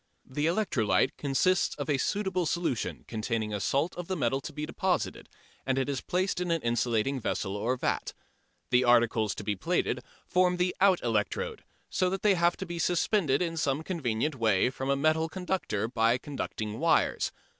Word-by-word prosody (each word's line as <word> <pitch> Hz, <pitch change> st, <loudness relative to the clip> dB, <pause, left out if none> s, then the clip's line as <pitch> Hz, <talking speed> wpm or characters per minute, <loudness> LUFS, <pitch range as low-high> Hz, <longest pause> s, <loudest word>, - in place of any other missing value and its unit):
The 145 Hz, +4 st, -1 dB
electrolyte 155 Hz, -, +1 dB
consists 160 Hz, +6 st, +1 dB
of -, -, -5 dB
a 145 Hz, -3 st, +1 dB
suitable 190 Hz, -3 st, 0 dB
solution 165 Hz, -7 st, -2 dB
containing 110 Hz, -1 st, -2 dB
a 105 Hz, -, -1 dB
salt 140 Hz, -, 0 dB
of 175 Hz, -1 st, -6 dB
the 185 Hz, -, -2 dB
metal 135 Hz, -2 st, 0 dB
to -, -, -7 dB
be 150 Hz, 0 st, -4 dB
deposited, 185 Hz, +2 st, -2 dB, 0.3 s
and 130 Hz, 0 st, 0 dB
it 135 Hz, -, +1 dB
is 140 Hz, -3 st, -2 dB
placed 185 Hz, 0 st, -1 dB
in 180 Hz, -, -2 dB
an 165 Hz, -3 st, 0 dB
insulating 120 Hz, +2 st, +1 dB
vessel 100 Hz, -3 st, -2 dB
or 115 Hz, +5 st, 0 dB
vat. -, -, -2 dB, 0.6 s
The 125 Hz, +1 st, +5 dB
articles 115 Hz, -3 st, +3 dB
to -, -, -6 dB
be 105 Hz, 0 st, -1 dB
plated 95 Hz, -, -1 dB, 0.2 s
form 180 Hz, 0 st, +2 dB
the 180 Hz, 0 st, 0 dB
out 190 Hz, -2 st, +4 dB
electrode, 110 Hz, -4 st, -1 dB, 0.3 s
so 185 Hz, -1 st, +1 dB
that 195 Hz, +1 st, -3 dB
they 210 Hz, -2 st, +5 dB
have 175 Hz, -1 st, +2 dB
to 190 Hz, -, -5 dB
be 170 Hz, -1 st, -5 dB
suspended 175 Hz, -3 st, +2 dB
in 165 Hz, -1 st, -3 dB
some 145 Hz, -1 st, 0 dB
convenient 150 Hz, -5 st, -1 dB
way 115 Hz, -2 st, +2 dB
from 135 Hz, +1 st, -4 dB
a 140 Hz, -, +3 dB
metal 155 Hz, +3 st, +2 dB
conductor 180 Hz, -, -2 dB
by 115 Hz, 0 st, +2 dB
conducting 110 Hz, -6 st, -5 dB
wires. 165 Hz, +1 st, +2 dB
140 Hz, 180 wpm, -29 LUFS, 120-180 Hz, 0.6 s, The